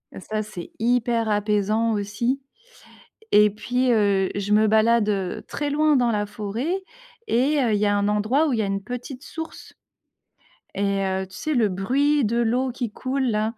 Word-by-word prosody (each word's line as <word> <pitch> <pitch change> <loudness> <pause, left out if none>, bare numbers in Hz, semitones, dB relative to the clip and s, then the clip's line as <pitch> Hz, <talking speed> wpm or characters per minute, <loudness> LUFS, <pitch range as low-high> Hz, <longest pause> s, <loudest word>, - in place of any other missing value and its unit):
Heu, - - -7
ça, 215 +3 -3
c'est 205 -5 -8
hyper 235 -1 +1
apaisant 210 +2 +1
aussi. 215 +6 -1 0.9
Et 210 0 +7
puis, 250 +4 0
heu, 200 -3 +2
je 205 +1 -1
me 215 +1 +4
balade, 220 0 +3
heu, 195 -3 -2
très 290 0 -3
loin 300 0 +3
dans 240 -2 +2
la 210 -1 0
forêt 215 - -3 0.5
et 275 +6 +2
heu, 230 -4 +1
il 205 - +1
y 210 - +2
a 205 0 +2
un 200 0 +1
endroit 215 +9 +2
où 275 - 0
il 225 - 0
y - - +3
a - - 0
une 195 0 -2
petite 250 +4 -7
source. 320 0 -8 1.0
Et 200 0 0
heu, 190 0 -1
tu - - -13
sais, 310 -1 -2
le 230 -5 +3
bruit 270 +9 +1
de 230 +3 0
l'eau 245 +3 +1
qui 240 -2 -4
coule 260 +4 -2
là, 215 +1 -1
220 Hz, 190 wpm, -23 LUFS, 205-250 Hz, 1.0 s, Et